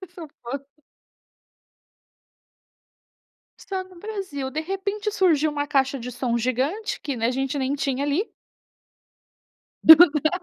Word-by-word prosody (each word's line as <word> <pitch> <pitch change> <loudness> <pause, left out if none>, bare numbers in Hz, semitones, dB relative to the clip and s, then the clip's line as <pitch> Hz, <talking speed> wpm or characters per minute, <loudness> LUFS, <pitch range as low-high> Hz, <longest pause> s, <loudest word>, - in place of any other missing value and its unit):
nem 375 - -11
sou 330 -3 -10
fã. 255 +4 -4 3.0
Só 380 -1 -5
no 370 -1 -17
Brasil. 375 -10 -5
De 310 - -2
repente 400 +5 -3
surgiu 325 -7 +2
uma 290 -1 -3
caixa 275 -1 +1
de 250 +1 -7
som 240 -1 -1
gigante 260 - -2
que, 280 -3 -4
né, 230 -1 0
a - - +1
gente 270 +2 -2
nem 265 +1 -1
tinha 275 -1 -2
ali. 295 +9 -1 1.6
Exato! 315 -2 +8
290 Hz, 125 wpm, -23 LUFS, 265-370 Hz, 3.0 s, Exato